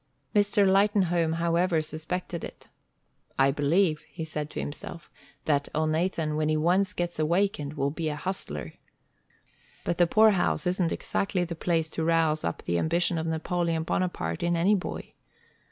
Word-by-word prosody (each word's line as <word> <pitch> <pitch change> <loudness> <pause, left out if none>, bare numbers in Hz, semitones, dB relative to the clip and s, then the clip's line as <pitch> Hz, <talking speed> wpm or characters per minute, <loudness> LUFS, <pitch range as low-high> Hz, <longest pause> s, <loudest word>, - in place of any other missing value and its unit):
Mr. 205 -1 +4
Lightenhome, 190 -4 +3
however, 170 +1 +1
suspected 160 +3 -4
it. - - -10 0.7
"I 135 +1 +4
believe," 155 +3 +2
he 165 - -6
said 150 -1 -4
to - - -6
himself, 155 +2 -7 0.3
"that 145 -2 +1
Elnathan, 155 0 0
when 155 0 0
he 155 - +2
once 180 +5 +2
gets 175 -2 -3
awakened, 155 -2 0
will 140 -1 0
be 160 +1 -2
a 150 - -3
hustler. 150 - -4 1.1
But 170 - -2
the 175 - +5
poorhouse 215 -1 +3
isn't 180 -1 +1
exactly 195 -2 -1
the 170 -1 -4
place 160 -1 -1
to 165 - -2
rouse 160 -1 +2
up 85 - -3
the 85 0 0
ambition 170 - +1
of 160 - -3
Napoleon 165 0 -1
Bonaparte 160 - -2
in 175 0 +1
any 185 +5 +3
boy. 190 -3 -4
165 Hz, 155 wpm, -27 LUFS, 155-180 Hz, 1.1 s, the